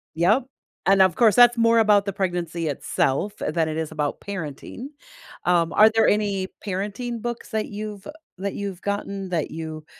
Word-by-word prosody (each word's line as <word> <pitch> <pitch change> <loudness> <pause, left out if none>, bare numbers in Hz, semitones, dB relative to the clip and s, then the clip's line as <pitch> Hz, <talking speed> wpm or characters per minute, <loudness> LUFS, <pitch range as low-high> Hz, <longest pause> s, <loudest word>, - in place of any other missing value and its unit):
Yep. 205 +10 +3 0.4
And 195 0 +5
of 185 -3 +4
course, 225 -4 +4
that's 240 -1 +7
more 230 0 +4
about 210 -2 +4
the 200 - -3
pregnancy 175 -4 -2
itself 145 +6 -1
than 160 +1 -1
it 155 - -3
is 160 -1 -3
about 150 -2 -2
parenting. 195 - -6 0.6
Um, 170 -2 +2
are 215 +1 +7
there 225 - +4
any 200 -2 +1 0.2
parenting 210 +5 -4
books 240 -1 -5
that 220 -1 -1
you've 210 0 -7 0.3
that 200 0 -3
you've 195 -3 -5
gotten 200 -1 -3
that 165 -4 -2
you 160 -1 -7
195 Hz, 170 wpm, -23 LUFS, 170-215 Hz, 0.6 s, that's